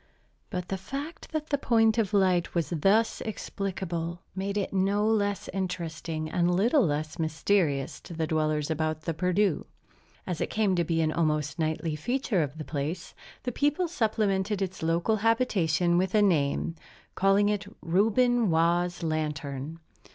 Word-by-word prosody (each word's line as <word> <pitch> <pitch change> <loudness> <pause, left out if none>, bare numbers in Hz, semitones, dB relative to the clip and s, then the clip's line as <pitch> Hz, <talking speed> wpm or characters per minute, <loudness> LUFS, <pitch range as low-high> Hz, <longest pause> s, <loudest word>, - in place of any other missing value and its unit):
But 180 -4 -4
the 195 - -2
fact 280 - -7
that 310 -1 -3
the 285 - +2
point 225 -3 +3
of 215 -3 +1
light 185 -5 +2
was 170 0 0
thus 195 +8 +2
explicable, 180 -5 -4
made 195 +1 -2
it 200 - -2
no 200 +2 +2
less 205 -3 +1
interesting 170 -4 -3
and 175 +2 +1
little 220 - +3
less 155 -1 -2
mysterious 160 -3 0
to 170 - -9
the 160 0 0
dwellers 155 -1 0
about 155 0 -1
the 165 +1 -2
Perdu. 180 +2 +1 0.6
As 175 -3 -3
it - - -1
came 210 -4 +1
to 175 - +2
be 165 0 0
an 155 -1 +1
almost 150 -2 0
nightly 160 0 -1
feature 245 - 0
of 150 0 -3
the 155 - -6
place, 155 +4 -4 0.3
the 250 - -2
people 295 +8 +1
supplemented 210 - 0
its 190 -1 -3
local 170 +7 +1
habitation 185 -7 +2
with 185 +2 0
a 210 - +5
name, 165 -4 +1 0.4
calling 195 +2 +3
it 205 -1 -1 0.2
"Reuben 225 +6 +3
Waugh's 170 +2 +1
Lantern." 150 -1 -3
180 Hz, 155 wpm, -28 LUFS, 160-210 Hz, 0.6 s, a